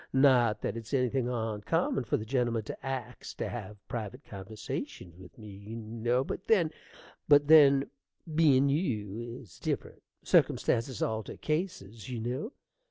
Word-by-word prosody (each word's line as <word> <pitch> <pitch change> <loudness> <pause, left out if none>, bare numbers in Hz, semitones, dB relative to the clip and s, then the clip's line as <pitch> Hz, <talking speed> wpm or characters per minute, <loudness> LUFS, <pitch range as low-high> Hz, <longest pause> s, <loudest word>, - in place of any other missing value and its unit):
Not 130 -5 +4
that - - -2
it's 115 +4 -4
anything 125 -1 +1
oncommon 115 - -1
fer - - +1
the 110 - -5
gentlemen 120 -2 0
to - - -8
ax 125 -2 -5
to - - -3
have 105 -3 -8
private 120 +3 -5
conversations 95 -3 -7
with 90 0 -15
me, 110 -2 -10
you 100 +3 -9
know; 115 +3 -1
but 175 - -6
then 180 -8 +4 0.6
but 145 -1 +6
then 140 -3 +7 0.5
bein' 140 -4 +5
you, 120 - -2
it's 100 - -17
different: - - -3 0.2
circumstances 115 0 +2
alter 110 -1 -3
cases, 140 - -3
you 125 -2 -4
know. 125 - -3
120 Hz, 145 wpm, -30 LUFS, 110-135 Hz, 0.6 s, then